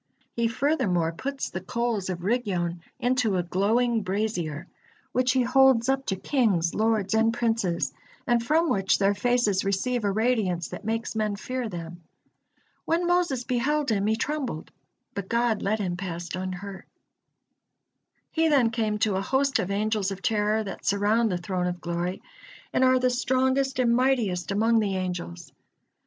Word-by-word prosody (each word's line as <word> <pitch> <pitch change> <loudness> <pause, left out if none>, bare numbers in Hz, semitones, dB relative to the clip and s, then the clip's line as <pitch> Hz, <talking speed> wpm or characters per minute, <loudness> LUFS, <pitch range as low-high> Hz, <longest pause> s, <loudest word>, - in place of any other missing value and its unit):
He 235 -1 +1
furthermore 230 - +1
puts 270 +11 -4
the 185 - -4
coals 230 -1 -2
of 175 -1 -4
Rigyon 185 -6 -1 0.2
into 245 -5 +1
a 175 - 0
glowing 225 +6 +1
brazier, 185 -5 -2 0.5
which 255 0 +2
he 260 -1 +3
holds 260 -1 +4
up 270 0 0
to 190 - 0
kings, 190 - +1
lords, 220 -2 +1
and 225 +1 +3
princes, 225 -7 0 0.3
and 240 -1 +2
from 315 +7 +2
which 195 -8 +2
their 200 0 +3
faces 215 -2 +1
receive 215 +5 0
a 200 - +1
radiance 210 -6 0
that - - -8
makes 225 +2 -2
men 215 -2 0
fear 250 +3 -4
them. 170 -1 -7 0.8
When 335 +2 +1
Moses 345 -8 +1
beheld 265 +3 0
him, 200 -1 +1
he 220 - +2
trembled, 260 - -3 0.4
but 200 -1 -5
God 235 -2 +1
led 215 +3 0
him 185 -4 -2
past 175 -2 -5
unhurt. 185 +1 -6 1.4
He 325 0 +2
then 265 -7 +3
came 220 -2 -1
to 210 -2 +1
a - - -1
host 270 +5 +1
of 195 -3 -2
Angels 210 0 0
of 195 0 -7
Terror 215 0 +1
that 195 - -7
surround 210 +3 +2
the 180 - 0
Throne 180 0 -2
of 180 0 -3
Glory, 175 +2 -3 0.5
and - - +3
are 255 0 +5
the 255 0 +2
strongest 260 +2 +1
and 240 -2 +3
mightiest 240 -9 +1
among 225 +3 +3
the 200 -3 0
angels. 180 - -5
220 Hz, 160 wpm, -26 LUFS, 190-250 Hz, 1.4 s, are